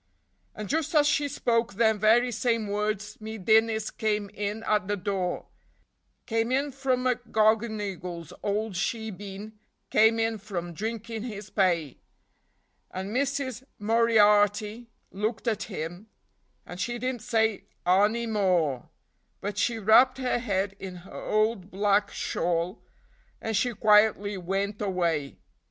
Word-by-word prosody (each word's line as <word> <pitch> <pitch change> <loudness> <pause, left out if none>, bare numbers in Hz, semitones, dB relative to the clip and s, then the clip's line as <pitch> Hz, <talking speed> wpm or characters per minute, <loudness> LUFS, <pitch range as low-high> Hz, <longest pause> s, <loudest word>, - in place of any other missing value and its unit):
And 215 -1 -6
just 315 - -1
as 295 -1 +6
she 290 0 +2
spoke 230 -5 0
them 220 -1 +3
very 235 +4 +4
same 230 -1 0
words 210 0 -2
me 220 +1 -6
Dinnis 220 +2 +2
came 210 -2 -1
in 210 +2 -4
at 210 -4 +1
the 205 0 -1
door, 185 -2 -2 0.8
Came 225 0 0
in 280 +2 +1
from 260 -2 -1
McGonigle's 215 - 0
ould 210 +1 -1
shebeen, 205 +1 -4 0.4
came 220 +1 +5
in 225 -1 0
from 175 -4 -5
drinkin' 225 +3 -4
his 210 -3 -7
pay; 170 - +1 0.9
And 190 +3 -5
Missis 270 -2 -1
Moriarty 210 0 +3 0.2
looked 215 +4 -3
at 220 -2 0
him, 175 +2 -6 0.6
and 180 - -9
she 240 +4 -2
didn't 250 -1 -3
say 220 -1 0 0.2
anny 205 +6 +3
more, 180 - +1 0.5
But 205 +1 -4
she 235 +3 +1
wrapped 225 +5 +5
her 255 -2 0
head 195 -4 -1
in 185 -2 -7
her - - -13 0.2
ould 215 -3 +1
black 200 +1 +2
shawl, 170 +3 -2 0.6
and 225 0 -3
she 245 +3 +1
quietly 210 -1 +4
wint 195 +3 -2
away. 170 -8 -1
215 Hz, 130 wpm, -27 LUFS, 195-230 Hz, 0.9 s, as